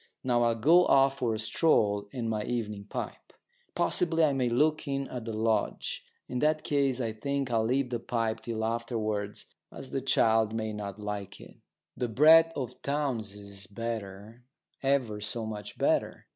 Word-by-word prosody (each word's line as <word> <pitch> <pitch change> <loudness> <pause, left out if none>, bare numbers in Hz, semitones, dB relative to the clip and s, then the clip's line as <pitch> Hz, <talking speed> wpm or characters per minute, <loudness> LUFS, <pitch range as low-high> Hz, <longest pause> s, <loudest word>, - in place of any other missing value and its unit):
Now 120 -2 +2
I'll 115 -1 +3
go 165 +10 +5
off 135 0 +4
for 120 -4 0
a - - -3
stroll 105 -3 +2
and 120 -3 -3
my 110 -1 -1
evening 105 -4 -3
pipe. - - -7 0.4
Possibly 165 -2 +2
I 150 -2 +4
may 130 -2 +1
look 150 +6 +1
in 135 -1 -2
at 125 -3 -6
the 115 - -4
lodge. 110 0 -1 0.2
In 125 - -3
that 155 +2 +2
case 140 -3 +1
I 115 -3 -1
think 135 +4 -3
I'll 115 -1 +2
leave 130 +2 0
the 120 - -1
pipe 115 -1 -2
till 110 -2 -3
afterwards, 110 -3 -2 0.3
as - - -9
the - - -1
child 110 -1 +3
may 110 -1 -2
not 100 -1 -6
like 105 -1 -5
it. - - -14 0.4
That 120 -3 -3
brat 160 +3 +7
of 125 -2 -5
Townes' 135 -8 -2
is 100 -1 -9
better 110 +1 -6 0.4
ever 130 -6 0
so 110 +2 -2
much 105 -2 -7
better. - - 0
115 Hz, 170 wpm, -29 LUFS, 110-135 Hz, 0.4 s, brat